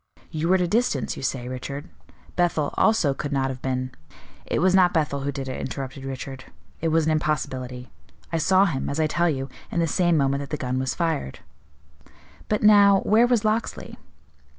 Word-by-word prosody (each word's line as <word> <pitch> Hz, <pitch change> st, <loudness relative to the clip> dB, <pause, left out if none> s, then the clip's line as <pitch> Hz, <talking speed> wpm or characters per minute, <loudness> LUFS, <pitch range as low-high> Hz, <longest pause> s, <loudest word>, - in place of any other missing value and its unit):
You 160 Hz, +1 st, -2 dB
were 190 Hz, -, +5 dB
at 185 Hz, -, +2 dB
a 175 Hz, -, +1 dB
distance, 195 Hz, -, 0 dB
you -, -, -8 dB
say, 130 Hz, -2 st, -2 dB
Richard; 140 Hz, +4 st, -6 dB, 0.5 s
Bethel, 170 Hz, -4 st, +1 dB
also, 195 Hz, -11 st, +3 dB
could 145 Hz, +2 st, -5 dB
not 135 Hz, -1 st, 0 dB
have 130 Hz, -1 st, -8 dB
been 130 Hz, -1 st, -2 dB, 0.3 s
" -, -, -25 dB
"It -, -, -1 dB
was 185 Hz, +3 st, +3 dB
not 185 Hz, -2 st, +5 dB
Bethel 150 Hz, -3 st, +1 dB
who 140 Hz, +1 st, -2 dB
did 135 Hz, -1 st, -5 dB
it," 130 Hz, -, -4 dB
interrupted 135 Hz, +1 st, -6 dB
Richard; 135 Hz, 0 st, -6 dB, 0.3 s
"it 165 Hz, -, -1 dB
was 160 Hz, 0 st, +2 dB
an 160 Hz, -, +2 dB
impossibility. 130 Hz, -5 st, -2 dB, 0.4 s
I 165 Hz, -, +1 dB
saw 190 Hz, +4 st, +4 dB
him, 150 Hz, -8 st, -2 dB
as 140 Hz, -, -3 dB
I 155 Hz, -, +3 dB
tell 170 Hz, +3 st, +1 dB
you, 135 Hz, -3 st, -2 dB, 0.2 s
in 170 Hz, -, -2 dB
the 165 Hz, -, +3 dB
same 175 Hz, +1 st, +2 dB
moment 140 Hz, -1 st, +1 dB
that 140 Hz, -, -7 dB
the 150 Hz, -, -2 dB
gun 130 Hz, -1 st, -2 dB
was 130 Hz, -1 st, -2 dB
fired." 160 Hz, -, -2 dB, 1.1 s
"But 210 Hz, -, 0 dB
now, 200 Hz, -2 st, +7 dB
where 225 Hz, +3 st, +4 dB
was 240 Hz, -3 st, +1 dB
Locksley?" 215 Hz, +2 st, -2 dB
150 Hz, 200 wpm, -24 LUFS, 135-175 Hz, 1.1 s, now